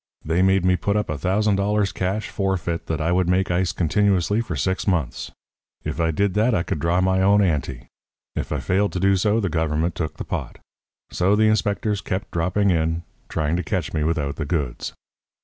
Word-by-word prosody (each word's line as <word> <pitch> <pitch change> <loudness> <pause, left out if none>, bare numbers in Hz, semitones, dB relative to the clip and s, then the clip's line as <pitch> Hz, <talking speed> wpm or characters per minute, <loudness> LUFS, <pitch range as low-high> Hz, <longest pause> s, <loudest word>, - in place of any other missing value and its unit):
They 80 +3 +1
made 95 -1 +3
me 90 0 +4
put 100 +4 0
up 105 -6 -1
a 75 - -3
thousand 100 +3 +1
dollars 100 0 +1
cash 95 +3 -2
forfeit 90 -4 -2
that 80 - -2
I 80 +2 0
would 90 0 +2
make 90 0 +2
ice 90 +1 +1
continuously 100 +3 +1
for 115 - -4
six 95 +2 -1
months. 80 -11 -1 0.5
If 80 - -4
I 85 -1 +2
did 100 +4 +1
that 110 +3 +2
I 85 - +1
could 75 - -3
draw 85 +4 +1
down - - +2
my 95 0 +2 0.2
ante. 70 -8 -1 0.5
If - - -3
I - - -1
failed 100 +2 +1
to 90 - -2
do 95 +1 +3
so 105 +4 +2
the 100 - 0
government 80 0 0
took 85 -4 -4
the - - -5
pot. - - -4 0.5
So 95 +3 +2
the 110 - +3
inspectors 105 0 0
kept 95 +1 -4
dropping 90 +4 +1
in, 80 0 0 0.3
trying 80 0 0
to 90 - -2
catch 90 -2 -2
me 80 -2 0
without 75 -3 -1
the 80 - -2
goods. 70 -5 -2
90 Hz, 205 wpm, -23 LUFS, 80-100 Hz, 0.5 s, me